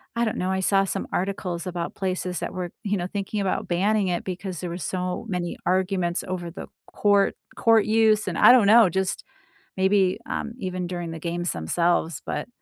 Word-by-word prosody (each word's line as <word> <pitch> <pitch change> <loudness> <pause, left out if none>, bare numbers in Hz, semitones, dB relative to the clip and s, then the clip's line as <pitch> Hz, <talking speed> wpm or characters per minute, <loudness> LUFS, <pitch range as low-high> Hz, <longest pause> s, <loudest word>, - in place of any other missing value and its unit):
I 235 - +1
don't 220 - -2
know, 185 +1 -1
I 190 - 0
saw 195 +1 +3
some 195 - -3
articles 185 -2 -2
about 175 -1 -4
places 185 -2 -2
that - - -4
were, 180 -2 -4
you 205 -1 0
know, 175 0 -2
thinking 205 +1 -3
about 190 - -1
banning 195 +3 +1
it 175 -1 -1
because 185 -1 -5
there 180 - -4
were 170 - -4
so 185 +4 -3
many 180 -3 -3
arguments 185 -1 0
over 175 -2 -4
the - - -8 0.3
court 200 -1 +3 0.2
court 225 -2 +4
use, 215 -1 +3
and 175 - -2
I - - +8
don't 235 -6 +6
know, 225 -1 +7
just 190 +2 -2 0.5
maybe, 190 -1 +3
um, 225 - -3
even 185 -3 -3
during 175 -2 -4
the 165 - -6
games 175 +1 -2
themselves, 165 - 0
but - - -3
185 Hz, 195 wpm, -24 LUFS, 175-200 Hz, 0.5 s, I